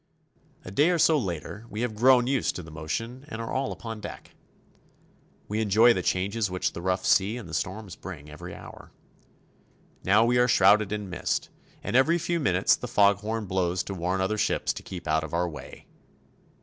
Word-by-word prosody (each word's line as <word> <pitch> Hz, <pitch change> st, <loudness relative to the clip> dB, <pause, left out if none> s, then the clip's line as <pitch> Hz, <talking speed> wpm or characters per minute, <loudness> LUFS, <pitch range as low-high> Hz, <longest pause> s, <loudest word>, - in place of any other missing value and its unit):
A 95 Hz, -, -7 dB
day 145 Hz, -, +3 dB
or 180 Hz, -, +2 dB
so 160 Hz, 0 st, +4 dB
later 100 Hz, -, -4 dB
we 105 Hz, -, -5 dB
have 120 Hz, -2 st, -1 dB
grown 125 Hz, +2 st, +5 dB
used 135 Hz, 0 st, 0 dB
to 90 Hz, -, -6 dB
the 80 Hz, -, -12 dB
motion 115 Hz, -, -5 dB
and 115 Hz, -, -7 dB
are 115 Hz, -, -5 dB
all 135 Hz, +1 st, -1 dB
upon 115 Hz, -2 st, -7 dB
deck. -, -, -9 dB, 1.2 s
We 105 Hz, +2 st, -1 dB
enjoy 110 Hz, +3 st, +5 dB
the 95 Hz, -, -2 dB
changes 100 Hz, +4 st, 0 dB
which 90 Hz, 0 st, -2 dB
the -, -, -6 dB
rough 95 Hz, +1 st, -1 dB
sea 100 Hz, +5 st, +3 dB
and 115 Hz, -, -8 dB
the 80 Hz, -, -10 dB
storms 95 Hz, +3 st, -4 dB
bring 80 Hz, -6 st, -9 dB
every 75 Hz, 0 st, -9 dB
hour. -, -, -12 dB, 1.1 s
Now 105 Hz, +4 st, +4 dB
we 120 Hz, +1 st, +3 dB
are 125 Hz, -, +4 dB
shrouded 105 Hz, -2 st, +4 dB
in 105 Hz, -1 st, -3 dB
mist, 90 Hz, -, -2 dB, 0.3 s
and -, -, -3 dB
every 155 Hz, +7 st, +4 dB
few 170 Hz, +1 st, -1 dB
minutes 95 Hz, -, +3 dB
the -, -, -7 dB
fog 100 Hz, -1 st, +4 dB
horn 110 Hz, +1 st, -3 dB
blows 90 Hz, -1 st, 0 dB
to 100 Hz, -, -6 dB
warn 90 Hz, +1 st, -1 dB
other 105 Hz, +3 st, -1 dB
ships -, -, 0 dB
to -, -, -8 dB
keep 90 Hz, -2 st, -8 dB
out 80 Hz, 0 st, +1 dB
of 80 Hz, +1 st, -5 dB
our 90 Hz, +1 st, +1 dB
way. 75 Hz, -3 st, -10 dB
100 Hz, 200 wpm, -27 LUFS, 90-115 Hz, 1.2 s, grown